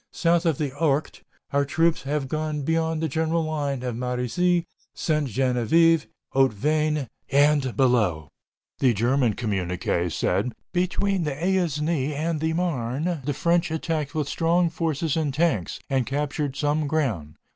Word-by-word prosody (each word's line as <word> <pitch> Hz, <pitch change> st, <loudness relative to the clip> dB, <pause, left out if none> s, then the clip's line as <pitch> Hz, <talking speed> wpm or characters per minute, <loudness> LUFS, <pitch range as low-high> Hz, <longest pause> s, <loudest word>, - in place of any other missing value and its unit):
South 170 Hz, 0 st, +2 dB
of 160 Hz, -5 st, +2 dB
the 145 Hz, -3 st, -2 dB
Ourcq 150 Hz, -1 st, 0 dB, 0.3 s
our 140 Hz, 0 st, +3 dB
troops 165 Hz, +4 st, +1 dB
have 140 Hz, 0 st, -2 dB
gone 155 Hz, 0 st, -2 dB
beyond 160 Hz, +1 st, 0 dB
the -, -, +2 dB
general 160 Hz, +3 st, 0 dB
line 145 Hz, -4 st, -2 dB
of 125 Hz, -2 st, -3 dB
Marizy, 125 Hz, +9 st, 0 dB, 0.3 s
Ste. 155 Hz, -2 st, 0 dB
Genevieve, 135 Hz, +6 st, +3 dB, 0.3 s
Hautvesnes, 145 Hz, +3 st, +1 dB, 0.2 s
and 145 Hz, +1 st, +4 dB, 0.2 s
Belleau." 110 Hz, -, +2 dB, 0.5 s
The 125 Hz, -4 st, +3 dB
German 120 Hz, +1 st, +2 dB
communiqué 90 Hz, -5 st, -1 dB
said: 125 Hz, -, 0 dB, 0.2 s
"Between 185 Hz, +1 st, 0 dB
the 150 Hz, -3 st, -2 dB
Aisne 160 Hz, -4 st, 0 dB
and 155 Hz, +2 st, -1 dB
the 160 Hz, +1 st, 0 dB
Marne, 160 Hz, -1 st, -1 dB
the 145 Hz, -, 0 dB
French 170 Hz, +2 st, +2 dB
attacked 160 Hz, -2 st, -2 dB
with 150 Hz, -3 st, -1 dB
strong 170 Hz, +2 st, +1 dB
forces 160 Hz, -2 st, -1 dB
and 155 Hz, -3 st, 0 dB
tanks, 140 Hz, -, 0 dB
and 130 Hz, -4 st, 0 dB
captured 145 Hz, 0 st, -2 dB
some 150 Hz, +1 st, 0 dB
ground." 115 Hz, -, -1 dB
150 Hz, 140 wpm, -25 LUFS, 130-165 Hz, 0.5 s, and